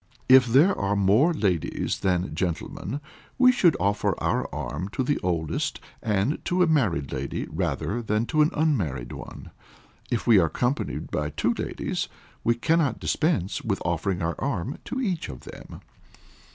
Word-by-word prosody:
If 130 Hz, -1 st, +7 dB
there 145 Hz, -, +5 dB
are 100 Hz, +1 st, 0 dB
more 105 Hz, -, +4 dB
ladies 95 Hz, -, -1 dB
than 90 Hz, -1 st, 0 dB
gentlemen, 95 Hz, -, -3 dB, 0.4 s
we 255 Hz, -1 st, +7 dB
should 195 Hz, -, +3 dB
offer 100 Hz, +1 st, +1 dB
our -, -, 0 dB
arm 95 Hz, -, -4 dB
to 130 Hz, -, 0 dB
the 145 Hz, +3 st, 0 dB
oldest, 85 Hz, -4 st, -1 dB, 0.2 s
and 105 Hz, +7 st, 0 dB
to 180 Hz, +1 st, +2 dB
a -, -, +5 dB
married 110 Hz, -, +1 dB
lady 70 Hz, 0 st, -3 dB
rather 100 Hz, +10 st, -2 dB
than 110 Hz, 0 st, 0 dB
to 155 Hz, +4 st, +2 dB
an 150 Hz, -, +5 dB
unmarried 90 Hz, -, 0 dB
one. -, -, -9 dB, 0.6 s
If 120 Hz, -, -1 dB
we 115 Hz, -5 st, +6 dB
are 85 Hz, -, +3 dB
accompanied 125 Hz, -, -2 dB
by 75 Hz, -1 st, -1 dB
two 75 Hz, -, 0 dB
ladies, -, -, -3 dB, 0.4 s
we 115 Hz, -, +3 dB
cannot 155 Hz, +3 st, +1 dB
dispense 110 Hz, -, 0 dB
with -, -, -1 dB
offering 90 Hz, -3 st, -1 dB
our 85 Hz, +1 st, 0 dB
arm 135 Hz, -, -2 dB
to 260 Hz, -, -3 dB
each 190 Hz, -10 st, -2 dB
of 65 Hz, -, -8 dB
them. -, -, -11 dB
110 Hz, 160 wpm, -25 LUFS, 90-150 Hz, 0.6 s, If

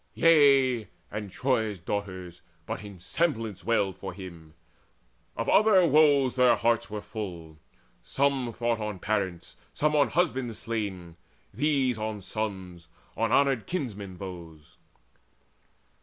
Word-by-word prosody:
Yea, 135 Hz, -8 st, +5 dB, 0.2 s
and 105 Hz, -1 st, -5 dB
Troy's 110 Hz, -6 st, 0 dB
daughters 95 Hz, -1 st, -5 dB, 0.2 s
but 95 Hz, -, -5 dB
in 100 Hz, -3 st, -10 dB
semblance 115 Hz, -, -2 dB
wailed 100 Hz, -5 st, +1 dB
For 95 Hz, -, -7 dB
him: 85 Hz, -4 st, -11 dB, 0.8 s
of -, -, -2 dB
other 205 Hz, -4 st, +5 dB
woes 145 Hz, -4 st, +4 dB
their 125 Hz, -1 st, +5 dB
hearts 115 Hz, -3 st, +1 dB
were 105 Hz, -1 st, -5 dB
full. 90 Hz, -7 st, -7 dB, 0.4 s
Some 135 Hz, -3 st, 0 dB
thought 115 Hz, 0 st, -1 dB
on 105 Hz, -2 st, -4 dB
parents, 95 Hz, -3 st, -3 dB, 0.2 s
some 150 Hz, 0 st, +1 dB
on 145 Hz, -, +4 dB
husbands 130 Hz, -9 st, 0 dB
slain, 95 Hz, -7 st, -4 dB, 0.4 s
These 130 Hz, -2 st, +1 dB
on 110 Hz, 0 st, -2 dB
their 105 Hz, -, -10 dB
sons, 95 Hz, -6 st, -5 dB, 0.3 s
on 115 Hz, 0 st, 0 dB
honoured 135 Hz, -5 st, +2 dB
kinsmen 105 Hz, -, -4 dB
those. 85 Hz, -5 st, -10 dB
110 Hz, 125 wpm, -27 LUFS, 95-130 Hz, 0.8 s, Yea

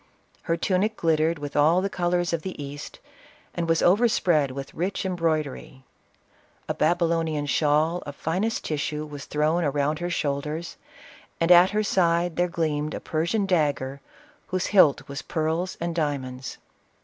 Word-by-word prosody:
Her 165 Hz, -, -1 dB
tunic 205 Hz, +5 st, 0 dB
glittered 160 Hz, 0 st, +1 dB
with 145 Hz, -1 st, -7 dB
all 155 Hz, +4 st, +4 dB
the 195 Hz, -, 0 dB
colors 175 Hz, -2 st, 0 dB
of 165 Hz, -, 0 dB
the 185 Hz, 0 st, -7 dB
East, 145 Hz, 0 st, -7 dB, 0.6 s
and 170 Hz, -1 st, -3 dB
was 165 Hz, -1 st, +2 dB
overspread 175 Hz, -, +3 dB
with 135 Hz, +1 st, -7 dB
rich 185 Hz, +4 st, -2 dB
em 185 Hz, -1 st, -1 dB
broidery. 155 Hz, -5 st, -2 dB, 0.8 s
A -, -, -1 dB
Babylonian 165 Hz, -2 st, +1 dB
shawl 155 Hz, +4 st, +1 dB
of 145 Hz, -, -6 dB
finest 190 Hz, +10 st, -2 dB
tissue 150 Hz, 0 st, -2 dB
was 145 Hz, -2 st, -8 dB
thrown 155 Hz, +3 st, +1 dB
around 145 Hz, +1 st, 0 dB
her 175 Hz, 0 st, -2 dB
shoulders, 150 Hz, +1 st, -3 dB, 0.6 s
and 165 Hz, +1 st, +2 dB
at 175 Hz, +1 st, +8 dB
her 215 Hz, +1 st, 0 dB
side 170 Hz, -3 st, +1 dB
there 175 Hz, 0 st, +2 dB
gleamed 155 Hz, -3 st, -2 dB
a -, -, -4 dB
Persian 170 Hz, +7 st, -1 dB
dagger 145 Hz, -6 st, 0 dB, 0.5 s
whose 185 Hz, 0 st, -1 dB
hilt 170 Hz, -8 st, +5 dB
was 140 Hz, 0 st, -5 dB
pearls 165 Hz, +3 st, -2 dB
and 170 Hz, 0 st, -2 dB
diamonds. 130 Hz, -5 st, -3 dB
165 Hz, 150 wpm, -25 LUFS, 145-175 Hz, 0.8 s, at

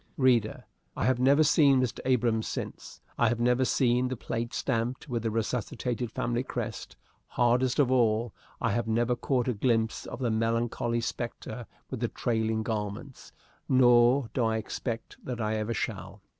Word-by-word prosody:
Reader, 120 Hz, -5 st, +2 dB, 0.3 s
I -, -, 0 dB
have 130 Hz, -1 st, +2 dB
never 140 Hz, +4 st, +5 dB
seen 145 Hz, -3 st, +5 dB
Mr. 130 Hz, -2 st, -1 dB
Abrahams 120 Hz, -3 st, +1 dB
since; -, -, -6 dB, 0.2 s
I 115 Hz, -, +4 dB
have 120 Hz, 0 st, -1 dB
never 125 Hz, +2 st, +3 dB
seen 125 Hz, -1 st, +2 dB
the 130 Hz, -1 st, -4 dB
plate 115 Hz, +2 st, -4 dB
stamped 125 Hz, +1 st, -2 dB
with 120 Hz, -4 st, -2 dB
the 115 Hz, -, -1 dB
resuscitated 120 Hz, +1 st, -2 dB
family 120 Hz, +1 st, -1 dB
crest; 130 Hz, -, -5 dB, 0.3 s
hardest 125 Hz, +1 st, +2 dB
of 135 Hz, -3 st, +3 dB
all, 115 Hz, -3 st, +2 dB, 0.3 s
I -, -, 0 dB
have 115 Hz, +2 st, -1 dB
never 120 Hz, +2 st, +1 dB
caught 125 Hz, -1 st, 0 dB
a 125 Hz, -, +1 dB
glimpse 115 Hz, 0 st, 0 dB
of -, -, -6 dB
the 120 Hz, -2 st, -1 dB
melancholy 115 Hz, +1 st, 0 dB
spectre 115 Hz, 0 st, -5 dB, 0.2 s
with 130 Hz, -, -4 dB
the 120 Hz, -, 0 dB
trailing 110 Hz, -2 st, -1 dB
garments, 110 Hz, +4 st, -5 dB, 0.4 s
nor 120 Hz, 0 st, +5 dB
do 125 Hz, -, +1 dB
I 110 Hz, 0 st, +1 dB
expect 115 Hz, +1 st, -5 dB
that 125 Hz, -2 st, -5 dB
I 110 Hz, 0 st, -1 dB
ever 110 Hz, +2 st, -2 dB
shall. -, -, -5 dB
120 Hz, 165 wpm, -28 LUFS, 115-125 Hz, 0.4 s, never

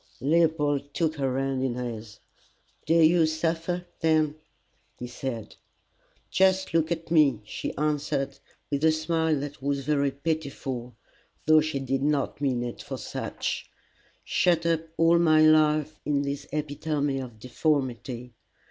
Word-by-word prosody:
Leopold 145 Hz, -1 st, +1 dB
took 160 Hz, -2 st, +1 dB
her 135 Hz, -2 st, 0 dB
hand 135 Hz, -1 st, -1 dB
in 130 Hz, -3 st, -1 dB
his. 115 Hz, -3 st, -6 dB, 0.7 s
"Do 165 Hz, -, +3 dB
you 165 Hz, 0 st, +5 dB
suffer 165 Hz, +2 st, -1 dB
then?" 155 Hz, -2 st, +2 dB, 0.6 s
he 125 Hz, -, -6 dB
said. 120 Hz, -2 st, -6 dB, 0.8 s
"Just 190 Hz, -1 st, +2 dB
look 165 Hz, 0 st, +2 dB
at 165 Hz, -1 st, -3 dB
me," 145 Hz, -8 st, +4 dB
she -, -, -5 dB
answered 145 Hz, -2 st, -1 dB, 0.3 s
with 140 Hz, +1 st, -1 dB
a 160 Hz, -, +6 dB
smile 160 Hz, -1 st, 0 dB
that 145 Hz, -1 st, -7 dB
was 140 Hz, 0 st, -1 dB
very 140 Hz, -1 st, +2 dB
pitiful, 135 Hz, -5 st, -4 dB, 0.5 s
though 155 Hz, 0 st, +6 dB
she 155 Hz, -2 st, -2 dB
did 135 Hz, 0 st, -1 dB
not 145 Hz, -1 st, 0 dB
mean 130 Hz, -4 st, 0 dB
it 120 Hz, -1 st, -6 dB
for -, -, -6 dB
such, -, -, -4 dB, 0.3 s
" -, -, -35 dB
shut 170 Hz, -2 st, +2 dB
up 165 Hz, -1 st, +2 dB, 0.2 s
all 165 Hz, +1 st, +5 dB
my 155 Hz, -2 st, +5 dB
life 155 Hz, -1 st, +4 dB
in 145 Hz, -1 st, 0 dB
this 140 Hz, 0 st, -4 dB
epitome 145 Hz, -1 st, -1 dB
of 125 Hz, -4 st, -8 dB
deformity! 125 Hz, -2 st, -2 dB
145 Hz, 140 wpm, -27 LUFS, 135-160 Hz, 0.8 s, a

